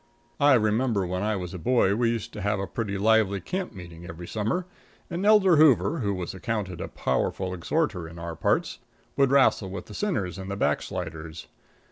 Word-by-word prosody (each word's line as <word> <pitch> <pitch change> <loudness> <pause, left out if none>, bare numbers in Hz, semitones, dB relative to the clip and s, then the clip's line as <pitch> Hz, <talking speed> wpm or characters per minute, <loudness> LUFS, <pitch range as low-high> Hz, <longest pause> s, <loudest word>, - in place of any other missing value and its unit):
I 145 -1 +6
remember 110 -2 +1
when 90 +1 -3
I 105 +1 0
was 90 -2 -5
a 90 - -6
boy, 100 +1 +3
we 115 +1 +2
used 115 -2 -3
to 105 - -6
have 100 +1 0
a 100 - -2
pretty 100 -2 -3
lively 105 -1 +3
camp 185 - -4
meeting 85 -2 -10
every 85 0 -8
summer, 110 - -1 0.5
and 175 +2 -2
Elder 195 -6 +6
Hoover, 150 +1 +4
who 100 -5 -1
was 90 -2 -4
accounted 95 -2 -3
a - - -3
powerful 95 +8 -1
exhorter 90 - -1
in 85 - -12
our 85 0 -5
parts, - - 0 0.4
would 140 -1 +3
wrastle 135 -7 +3
with 95 - -6
the - - -11
sinners 110 - -2
and 95 0 -6
the 100 - -3
backsliders. 80 -5 -3
100 Hz, 190 wpm, -26 LUFS, 90-125 Hz, 0.5 s, I